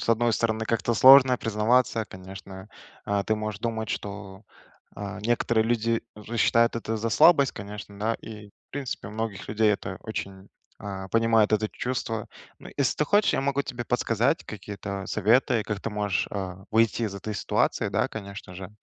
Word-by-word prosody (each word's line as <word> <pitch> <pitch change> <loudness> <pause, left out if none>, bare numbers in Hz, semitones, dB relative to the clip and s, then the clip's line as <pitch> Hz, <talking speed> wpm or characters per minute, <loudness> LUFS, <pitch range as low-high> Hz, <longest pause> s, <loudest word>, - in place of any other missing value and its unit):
с - - -5
одной 115 +1 +3
стороны, 110 0 0
как-то 115 +1 0
сложно 130 +2 +8
признаваться, 115 +1 +1
конечно, 95 0 -10 0.4
э. 100 -1 +1
Ты 110 - +2
можешь 110 -1 -4
думать, 110 -2 -3
что, 100 0 -6 0.5
э, 105 0 -6
некоторые 115 0 +1
люди 115 0 0
же 110 +2 -7
считают 115 0 +3
это 115 -1 -3
за 115 +1 -2
слабость, 140 +3 +5
конечно, 100 0 -9
да? 110 +2 0
И 105 -2 -10
в - - -32
принципе, 135 -7 -5
у - - -9
многих 110 -2 -5
людей 110 0 +3
это 95 -2 -5
очень 100 -3 -6 0.3
э, 95 -1 -6
понимают 115 -2 +3
это 110 0 +2
чувство. 115 -3 -3 0.3
Ну, - - -12
ес 140 -3 +1
ты 150 - +1
хочешь, 205 +7 +3
я - - +1
могу 140 +1 0
тебе 120 -3 -6
подсказать 120 +4 +1
какие-то 100 -1 -6
советы, 115 +2 +2
как 105 -1 -4
ты 115 - -4
можешь, 105 -2 -1
э, 95 -1 -5
выйти 115 +1 +2
из 105 -3 -2
этой 105 +2 -5
ситуации, - - 0
да, - - 0
конечно 100 -3 -8
же. 95 0 -7
110 Hz, 175 wpm, -26 LUFS, 100-115 Hz, 0.5 s, сложно